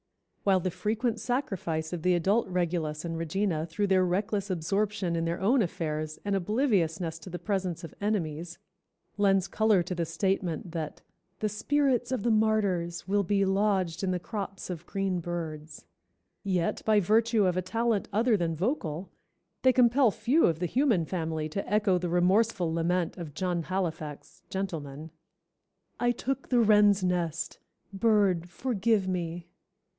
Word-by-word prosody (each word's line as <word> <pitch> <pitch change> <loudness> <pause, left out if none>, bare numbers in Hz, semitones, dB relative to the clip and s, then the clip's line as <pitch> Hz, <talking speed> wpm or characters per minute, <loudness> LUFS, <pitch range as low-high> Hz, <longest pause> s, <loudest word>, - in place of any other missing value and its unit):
While 190 -2 +3
the 185 - -1
frequent 225 +4 -1
sacrifice 180 - -2
of 175 - -3
the 180 +2 +3
adult 195 +7 +2
regulus 170 -4 -1
and 165 -1 -3
regina 165 0 -1
through 165 +5 -1
their 190 -1 +3
reckless 200 +3 -1
absorption 190 +1 -1
in 165 0 0
their 170 +1 -2
own 235 +7 +3
affairs 155 -4 -3
and 200 -1 +1
obliviousness 180 - 0
to 165 - -10
the 175 - -5
presence 190 -4 -2
of 165 - -8
enemies, 170 -5 -2 0.6
lends 195 -2 +3
color 210 -3 +3
to 180 - -4
the 170 -2 -2
statement 175 -1 -1
that 160 -3 -5 0.3
"The 215 - -1
spirits 255 +2 +1
of 255 -6 -1
the 235 - +2
martyrs 200 -6 +1
will 205 +1 +2
be 200 +1 +1
lodged 190 -3 +1
in 190 - +1
the 180 - +1
crops 195 0 -5
of 170 -1 -7
green 195 -2 -1
birds," 160 - -6 0.6
yet 180 -4 0
by 215 -1 +4
virtue 220 +2 +3
of 180 -1 +1
a 185 - +1
talent 225 +2 0
other 225 +3 +3
than 170 -4 -1
vocal, 180 - -2 0.5
they 260 - +6
compel 250 0 +5
few 265 +9 +2
of 165 - +1
the 175 - -2
human 235 - +2
family 160 -3 -2
to 195 +6 -4
echo 205 -3 +3
the 175 0 -2
remorseful 180 0 +2
lament 170 +2 0
of 160 -5 -7
John 180 -1 -1
Halifax, 160 -4 -4
Gentleman, 160 -5 -5 0.9
"I 245 - +2
took 265 +2 -2
the 245 - +3
wren's 210 -2 +5
nest, 175 -3 -1 0.3
Bird, 195 -5 +2
forgive 220 -2 0
me!" 175 -2 -3
185 Hz, 155 wpm, -28 LUFS, 170-210 Hz, 0.9 s, they